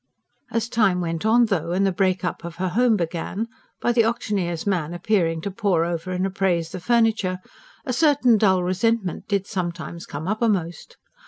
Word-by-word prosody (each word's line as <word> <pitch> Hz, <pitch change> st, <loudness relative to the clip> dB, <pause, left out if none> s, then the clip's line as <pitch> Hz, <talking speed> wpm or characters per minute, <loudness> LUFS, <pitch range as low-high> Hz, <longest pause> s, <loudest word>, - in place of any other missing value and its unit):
As 230 Hz, 0 st, -1 dB
time 210 Hz, -6 st, +2 dB
went 165 Hz, +2 st, -2 dB
on, 235 Hz, +2 st, +5 dB
though, 175 Hz, -6 st, -1 dB
and 195 Hz, +2 st, +2 dB
the 195 Hz, -, +2 dB
break 185 Hz, -1 st, 0 dB
up 170 Hz, -, -3 dB
of 170 Hz, -1 st, -7 dB
her 185 Hz, +1 st, -2 dB
home 230 Hz, +3 st, +3 dB
began 175 Hz, +5 st, -3 dB, 0.3 s
by 240 Hz, -, +1 dB
the 235 Hz, -1 st, +4 dB
auctioneer's 195 Hz, -7 st, -1 dB
man 175 Hz, -5 st, -1 dB
appearing 175 Hz, -4 st, +1 dB
to 200 Hz, -, -4 dB
paw 190 Hz, -5 st, +1 dB
over 170 Hz, +1 st, -3 dB
and 185 Hz, +1 st, -1 dB
appraise 185 Hz, -4 st, 0 dB
the 185 Hz, -, -5 dB
furniture 220 Hz, -3 st, +2 dB, 0.5 s
a 255 Hz, -, -2 dB
certain 260 Hz, -5 st, +4 dB
dull 190 Hz, -3 st, +3 dB
resentment 190 Hz, +1 st, 0 dB
did 200 Hz, -2 st, 0 dB
sometimes 170 Hz, -3 st, -5 dB
come 150 Hz, +4 st, -6 dB
uppermost. 200 Hz, -6 st, -1 dB
190 Hz, 175 wpm, -23 LUFS, 175-220 Hz, 0.5 s, on